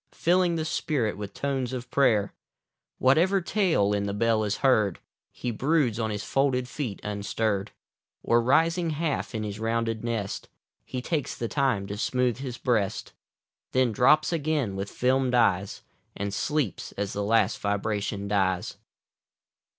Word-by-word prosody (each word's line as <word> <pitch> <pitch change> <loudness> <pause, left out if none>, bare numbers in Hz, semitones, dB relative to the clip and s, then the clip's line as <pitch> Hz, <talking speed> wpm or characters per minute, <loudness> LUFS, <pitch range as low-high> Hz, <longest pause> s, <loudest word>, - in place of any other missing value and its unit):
Filling 175 0 +2
the 160 -1 -2
spirit 135 -8 -1
with 100 0 -6
tones 135 -3 -2
of 125 -1 -6
prayer 110 -7 +3 0.6
Whatever 170 +9 +4
tale 170 - +1
in 100 0 0
the 100 - -3
bell 110 0 +2
is 105 -1 -1
heard, 105 -8 +3 0.4
lie 125 - 0
broods 130 -1 +1
on 110 -1 0
his 105 -1 -3
folded 130 -2 +1
feet 125 -7 -4
unstirr'd, 105 0 -1 0.6
Oi, 115 - +4
rising 165 +8 +3
half 155 -5 -2
in 110 - -2
his 105 0 -5
rounded 115 0 -1
nest. 115 -4 -3 0.4
He 125 -1 -5
takes 150 -3 -2
the 115 - -3
time 130 -7 0
to 100 +1 -5
smooth 125 +2 0
his 130 -3 -5
breast. 110 -6 -1 0.6
Then 130 -2 +3
drops 150 +9 +4
again 150 -9 0
with 100 +1 -4
fdmed 130 0 +1
eyes, 100 -5 +1 0.3
And 100 0 -3
sleeps 145 0 -2
as 100 0 -3
the 100 - -2
last 105 -1 +2
vibration 100 0 -2
dies. 95 -3 0
115 Hz, 150 wpm, -27 LUFS, 105-140 Hz, 0.6 s, Whatever